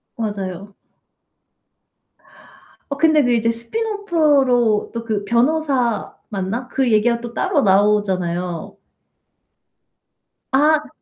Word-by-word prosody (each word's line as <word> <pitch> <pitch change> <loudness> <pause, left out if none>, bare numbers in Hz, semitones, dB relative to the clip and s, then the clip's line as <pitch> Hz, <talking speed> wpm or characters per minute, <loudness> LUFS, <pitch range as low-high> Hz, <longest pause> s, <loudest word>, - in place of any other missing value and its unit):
맞아요. 200 -3 -5 2.2
어 280 - -3
근데 315 -1 +4
그 245 - +1
이제 230 0 +2
스핀오프로 285 - +1
또 230 -1 -4
그 215 -3 -2
변호사 255 0 0 0.2
맞나? 205 +5 -4
그 260 -1 0
얘기가 235 +2 +2
또 235 -1 -8
따로 355 +1 +1
나오잖아요. 190 -5 0 1.7
아. 300 +2 +3
235 Hz, 185 characters per minute, -19 LUFS, 205-285 Hz, 2.2 s, 근데